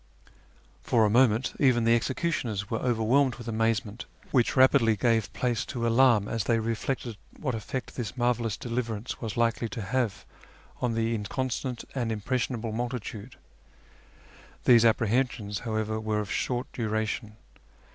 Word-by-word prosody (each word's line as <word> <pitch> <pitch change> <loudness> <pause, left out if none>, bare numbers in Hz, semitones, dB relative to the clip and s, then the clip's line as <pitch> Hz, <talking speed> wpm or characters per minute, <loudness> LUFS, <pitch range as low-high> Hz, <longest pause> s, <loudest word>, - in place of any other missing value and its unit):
For 115 -2 +3
a 105 - +2
moment 120 0 +3
even 125 -4 +4
the 115 +1 +5
executioners 120 - -2
were 115 - 0
overwhelmed 125 +3 +2
with 120 -1 -10
amazement, 115 -1 -1 0.3
which 125 -4 +2
rapidly 130 -4 +5
gave 115 0 +1
place 120 -3 0
to 120 -3 -3
alarm 115 -3 +4
as 115 -3 -2
they 115 - +2
reflected 115 +1 -3 0.2
what 130 -5 -2
efiect 115 +3 -5
this 120 -1 -5
marvellous 120 -3 0
deliverance 115 -2 -4
was 110 -2 -4
likely 115 0 +1
to 110 - -5
have 115 -1 -1 0.6
on 120 -2 0
the 115 0 0
inconstant 125 +3 -3
and 120 -4 -1
impressionable 115 +1 -2
multitude. 120 -1 -5 1.3
These 115 -2 +6
apprehensions, 110 -2 +1
however, 110 -1 -2
were 110 -1 -1
of 105 - -4
short 125 0 -2
duration. 110 -1 -2
115 Hz, 135 wpm, -28 LUFS, 110-125 Hz, 1.3 s, These